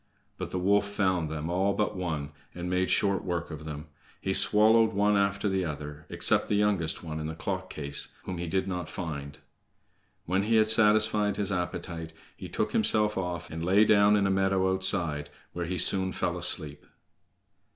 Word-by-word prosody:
But -, -, -4 dB
the -, -, -4 dB
wolf 100 Hz, +3 st, +2 dB
found 95 Hz, -5 st, 0 dB
them 80 Hz, 0 st, -4 dB
all 95 Hz, +3 st, 0 dB
but 105 Hz, 0 st, -1 dB
one, 80 Hz, -6 st, -4 dB, 0.2 s
and 90 Hz, 0 st, -5 dB
made 90 Hz, 0 st, 0 dB
short 100 Hz, -2 st, +1 dB
work 85 Hz, -2 st, -3 dB
of 75 Hz, 0 st, -8 dB
them. 75 Hz, 0 st, -7 dB, 0.3 s
He 95 Hz, -, -2 dB
swallowed 110 Hz, +3 st, +4 dB
one 105 Hz, +1 st, +2 dB
after 100 Hz, +1 st, 0 dB
the 95 Hz, -1 st, 0 dB
other, 75 Hz, -1 st, -7 dB
except -, -, +2 dB
the 105 Hz, -, 0 dB
youngest 100 Hz, -7 st, 0 dB
one 80 Hz, -2 st, -5 dB
in 75 Hz, -, -4 dB
the 80 Hz, -, -6 dB
clock 95 Hz, +2 st, -4 dB
case, 70 Hz, -1 st, -2 dB
whom 90 Hz, -2 st, -6 dB
he 85 Hz, -, -4 dB
did 95 Hz, +3 st, -1 dB
not 90 Hz, -4 st, -4 dB
find. 75 Hz, -4 st, -6 dB, 0.9 s
When 95 Hz, +3 st, 0 dB
he 115 Hz, +1 st, +1 dB
had 110 Hz, -1 st, +5 dB
satisfied 105 Hz, -1 st, +4 dB
his 100 Hz, -1 st, -1 dB
appetite, 85 Hz, -2 st, -4 dB, 0.2 s
he -, -, -9 dB
took -, -, -2 dB
himself 105 Hz, 0 st, +4 dB
off, 90 Hz, -2 st, -4 dB
and 80 Hz, +1 st, -5 dB
lay 100 Hz, +5 st, +4 dB
down 105 Hz, -1 st, +5 dB
in 100 Hz, -1 st, +2 dB
a 95 Hz, -, +1 dB
meadow 95 Hz, -1 st, +1 dB
outside, 85 Hz, -6 st, -1 dB, 0.2 s
where 85 Hz, -1 st, -4 dB
he 90 Hz, +1 st, -3 dB
soon 95 Hz, +2 st, +2 dB
fell -, -, -2 dB
asleep. 75 Hz, -1 st, -1 dB
95 Hz, 185 wpm, -28 LUFS, 80-100 Hz, 0.9 s, had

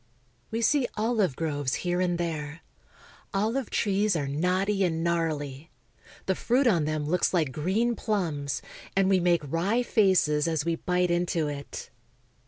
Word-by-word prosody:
We 225 Hz, +1 st, -2 dB
see 275 Hz, +1 st, +3 dB
olive 215 Hz, -, +1 dB
groves 145 Hz, -4 st, -1 dB
here 175 Hz, +1 st, +1 dB
and 175 Hz, -1 st, +1 dB
there. 160 Hz, -2 st, -4 dB, 0.7 s
OHve 225 Hz, +5 st, 0 dB
trees 205 Hz, -1 st, +1 dB
are 145 Hz, -4 st, -1 dB
knotty 185 Hz, +7 st, +1 dB
and 165 Hz, -2 st, 0 dB
gnarly. 155 Hz, -4 st, -2 dB, 0.6 s
The 190 Hz, -, +2 dB
fruit 250 Hz, +8 st, +1 dB
on 175 Hz, -10 st, +3 dB
them 155 Hz, -1 st, -1 dB
looks 180 Hz, +4 st, +1 dB
like 155 Hz, -6 st, +1 dB
green 200 Hz, -, 0 dB
plums, 165 Hz, -, -2 dB, 0.3 s
and 195 Hz, 0 st, +3 dB
we 190 Hz, -1 st, +4 dB
make 175 Hz, -1 st, +3 dB
wry 185 Hz, -, 0 dB
faces 185 Hz, -10 st, +3 dB
as 160 Hz, -2 st, 0 dB
we 170 Hz, -1 st, +1 dB
bite 180 Hz, 0 st, 0 dB
into 175 Hz, -2 st, 0 dB
it. 145 Hz, -1 st, -7 dB
175 Hz, 150 wpm, -27 LUFS, 155-200 Hz, 0.7 s, we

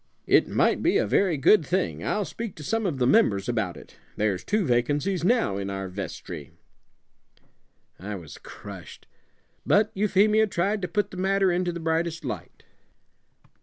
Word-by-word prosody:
It -, -, +4 dB
might -, -, +2 dB
be -, -, +3 dB
a -, -, +2 dB
very 185 Hz, -6 st, +2 dB
good 165 Hz, +7 st, +5 dB
thing. 185 Hz, +6 st, -1 dB
I'll 210 Hz, -1 st, -1 dB
speak 200 Hz, +7 st, -6 dB
to 150 Hz, -, -10 dB
some 225 Hz, +6 st, -1 dB
of 155 Hz, -7 st, -2 dB
the 125 Hz, -, +1 dB
members 100 Hz, -6 st, +3 dB
about 110 Hz, -7 st, -1 dB
it. -, -, -15 dB, 0.2 s
There's 100 Hz, -3 st, -1 dB
two 210 Hz, -2 st, 0 dB
vacancies 145 Hz, +9 st, 0 dB
now 225 Hz, -, +2 dB
in 100 Hz, 0 st, -4 dB
our 95 Hz, -1 st, -4 dB
vestry.'" 90 Hz, -5 st, -7 dB, 1.5 s
I 105 Hz, +3 st, -5 dB
was 85 Hz, -6 st, -10 dB
crushed; -, -, -11 dB, 0.6 s
but 210 Hz, +1 st, +3 dB
Euphemia 210 Hz, +2 st, +3 dB
tried 200 Hz, +3 st, -1 dB
to 180 Hz, -, -2 dB
put 205 Hz, +4 st, -1 dB
the 185 Hz, -, -9 dB
matter 195 Hz, 0 st, +2 dB
into 175 Hz, 0 st, 0 dB
the 170 Hz, -, -6 dB
brightest 165 Hz, 0 st, -1 dB
light. 105 Hz, -, -7 dB
170 Hz, 165 wpm, -26 LUFS, -, 1.5 s, good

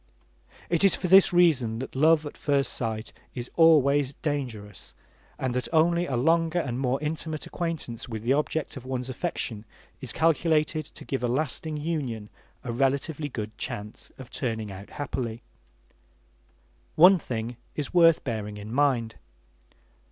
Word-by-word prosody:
It 170 Hz, 0 st, +1 dB
is 195 Hz, -, +6 dB
for -, -, -3 dB
this 190 Hz, +2 st, +7 dB
reason 150 Hz, -11 st, +3 dB
that 130 Hz, -, -6 dB
love 155 Hz, +2 st, +4 dB
at 145 Hz, -, -7 dB
first 140 Hz, -1 st, 0 dB
sight 110 Hz, -2 st, -3 dB, 0.2 s
is 125 Hz, -1 st, -6 dB
always 145 Hz, -4 st, +4 dB
dangerous, 115 Hz, -, -4 dB, 0.4 s
and 130 Hz, -2 st, -2 dB
that 125 Hz, 0 st, -1 dB
only 170 Hz, +2 st, +3 dB
a 130 Hz, -, -1 dB
longer 165 Hz, +6 st, +2 dB
and 130 Hz, -7 st, -1 dB
more 130 Hz, 0 st, 0 dB
intimate 155 Hz, 0 st, -3 dB
acquaintance 160 Hz, -10 st, -4 dB
with 110 Hz, -2 st, -5 dB
the 125 Hz, +3 st, +3 dB
object 150 Hz, +1 st, -1 dB
of 135 Hz, -, -8 dB
one's 130 Hz, 0 st, -4 dB
affection 120 Hz, -7 st, -3 dB, 0.4 s
is -, -, -3 dB
calculated 155 Hz, -1 st, +2 dB
to -, -, -12 dB
give 135 Hz, -, -2 dB
a 125 Hz, -, +1 dB
lasting 150 Hz, +4 st, -1 dB
union 140 Hz, -9 st, -3 dB, 0.3 s
a 125 Hz, -, -4 dB
relatively 140 Hz, +4 st, 0 dB
good 110 Hz, -4 st, -6 dB
chance 105 Hz, +1 st, -5 dB
of 130 Hz, -2 st, -11 dB
turning 110 Hz, -5 st, -3 dB
out 95 Hz, +1 st, -10 dB
happily. 120 Hz, -5 st, -4 dB, 1.5 s
One 180 Hz, +3 st, +7 dB
thing 115 Hz, -3 st, -4 dB, 0.2 s
is 150 Hz, -3 st, -4 dB
worth 165 Hz, -2 st, +5 dB
bearing 105 Hz, -4 st, -4 dB
in 105 Hz, +2 st, -7 dB
mind. 125 Hz, -5 st, +2 dB
135 Hz, 150 wpm, -27 LUFS, 120-160 Hz, 1.5 s, this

